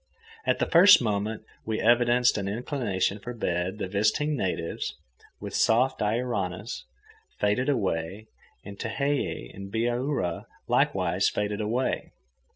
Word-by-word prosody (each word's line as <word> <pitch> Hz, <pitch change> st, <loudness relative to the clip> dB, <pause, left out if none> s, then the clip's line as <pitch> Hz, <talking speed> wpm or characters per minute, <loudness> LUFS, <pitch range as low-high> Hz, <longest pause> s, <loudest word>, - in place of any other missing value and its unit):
At -, -, +3 dB
the -, -, +1 dB
first 185 Hz, +4 st, +8 dB
moment 105 Hz, -1 st, -2 dB, 0.2 s
we 110 Hz, -1 st, -2 dB
evidenced 120 Hz, +1 st, +4 dB
an 100 Hz, -, -3 dB
inclination 105 Hz, -, -1 dB
for 120 Hz, +4 st, -7 dB
bed 90 Hz, -2 st, -2 dB
the 105 Hz, -, -3 dB
visiting 110 Hz, +10 st, +1 dB
natives, 90 Hz, -8 st, -3 dB, 0.4 s
with -, -, -7 dB
soft 125 Hz, +4 st, +3 dB
Iaoranas, 105 Hz, -, -2 dB, 0.5 s
faded 105 Hz, +7 st, +1 dB
away, 100 Hz, -, -1 dB, 0.4 s
and 100 Hz, 0 st, -9 dB
Tehei 140 Hz, -, -2 dB
and 95 Hz, 0 st, -9 dB
Bihaura 120 Hz, -, -1 dB, 0.2 s
likewise -, -, +2 dB
faded 105 Hz, 0 st, -2 dB
away. 120 Hz, +5 st, -1 dB
110 Hz, 120 wpm, -27 LUFS, 100-125 Hz, 0.5 s, first